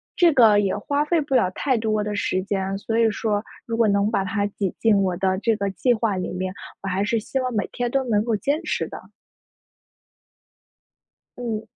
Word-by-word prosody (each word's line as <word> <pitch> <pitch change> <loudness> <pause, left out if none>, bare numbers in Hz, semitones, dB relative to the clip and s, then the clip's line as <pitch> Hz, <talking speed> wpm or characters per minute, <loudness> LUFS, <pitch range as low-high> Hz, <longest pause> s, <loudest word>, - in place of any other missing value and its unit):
这 345 -2 +5
个 225 -6 +6
也 195 -1 0
花 285 +7 0
费 335 +2 +2
不 280 -3 -1
了 185 -7 +3
太 260 +6 0
多 215 -1 0
的 210 0 -3
时 185 -2 0
间， 195 -1 -2
所 225 +3 -2
以 225 -1 +4
说 210 -1 -1 0.2
如 230 - -3
果 230 - +4
能 200 +1 +2
把 215 -3 0
它 200 +1 -1
挤 200 -2 -3
进 220 -3 +4
我 185 -2 -1
的 190 0 +1
这 225 +1 +1
个 200 -1 -1
计 245 +6 +2
划 220 -3 0
里 185 -1 -3
面， 185 +1 -3 0.3
我 - - -6
还 190 +2 0
是 230 +2 +1
希 220 - -4
望 255 -1 -2
每 210 -3 -1
天 245 -1 -2
都 275 - +2
能 210 -2 +2
够 230 0 -1
坚 285 - -1
持 - - -1
的。 - - -8 2.4
嗯。 230 -3 -3
215 Hz, 225 characters per minute, -23 LUFS, 195-235 Hz, 2.4 s, 个